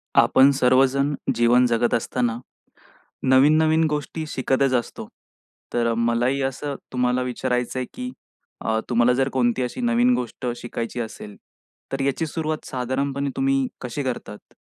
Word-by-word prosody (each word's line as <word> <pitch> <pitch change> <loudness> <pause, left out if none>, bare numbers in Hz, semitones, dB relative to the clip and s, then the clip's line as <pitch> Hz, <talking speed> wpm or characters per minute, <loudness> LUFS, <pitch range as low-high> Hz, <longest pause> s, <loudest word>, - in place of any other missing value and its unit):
आपण 135 +1 +6
सर्वजण 135 +3 +3 0.2
जीवन 120 +2 +4
जगत 120 0 +1
असताना, 120 0 -1 0.8
नवीन-नवीन 155 +5 +4
गोष्टी 150 +2 -3
शिकतच 130 -1 0
असतो. 120 -2 -2 0.7
तर 120 -1 +1
अ, - - 0
मलाही 120 +3 +1
असं 140 +2 -3 0.2
तुम्हाला 125 0 +1
विचारायचंय, 125 0 -2
की 250 0 -5 0.5
अ, 110 0 +1
तुम्हाला 120 0 +3
जर 135 +2 +1
कोणती 125 -1 +1
अशी 125 - -4
नवीन 240 +1 +3
गोष्ट 125 - -5
शिकायची 120 0 -5
असेल, 110 -2 -7 0.6
तर 135 - -2
याची 140 +4 0
सुरुवात 155 0 -3
साधारणपणे 135 +2 -2
तुम्ही 135 0 +1
कशी 125 +3 -4
करतात? 120 -5 -6
130 Hz, 130 wpm, -23 LUFS, 120-140 Hz, 0.8 s, आपण